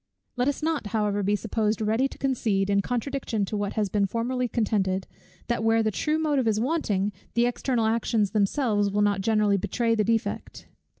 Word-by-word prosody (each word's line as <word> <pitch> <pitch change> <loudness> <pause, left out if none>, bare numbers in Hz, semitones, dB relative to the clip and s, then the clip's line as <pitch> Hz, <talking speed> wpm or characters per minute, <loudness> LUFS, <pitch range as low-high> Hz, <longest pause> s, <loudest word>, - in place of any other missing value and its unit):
Let 250 +1 0
us 285 +2 -1
not 315 -8 -1
however 210 -2 0
be 205 +1 +1
supposed 215 0 -1
ready 220 +5 +1
to - - -12
concede, 215 -7 0
in 200 0 +3
contradiction 245 -2 -2
to 210 - -4
what 205 -1 -2
has 215 -2 0
been 200 +1 +1
formerly 245 +4 -1
contended, 195 -5 0 0.4
that 235 -2 -1
where 225 0 +3
the 215 - +1
true 305 +9 0
motive 295 -6 +1
is 215 -1 +2
wanting, 220 - 0 0.2
the 235 0 +4
external 245 -1 0
actions 220 -2 +1
themselves 205 -1 +1
will 205 +1 +1
not 205 -2 +1
generally 210 -1 +2
betray 230 +4 0
the 215 -2 +2
defect. 225 -1 -2
220 Hz, 185 wpm, -26 LUFS, 205-245 Hz, 0.4 s, the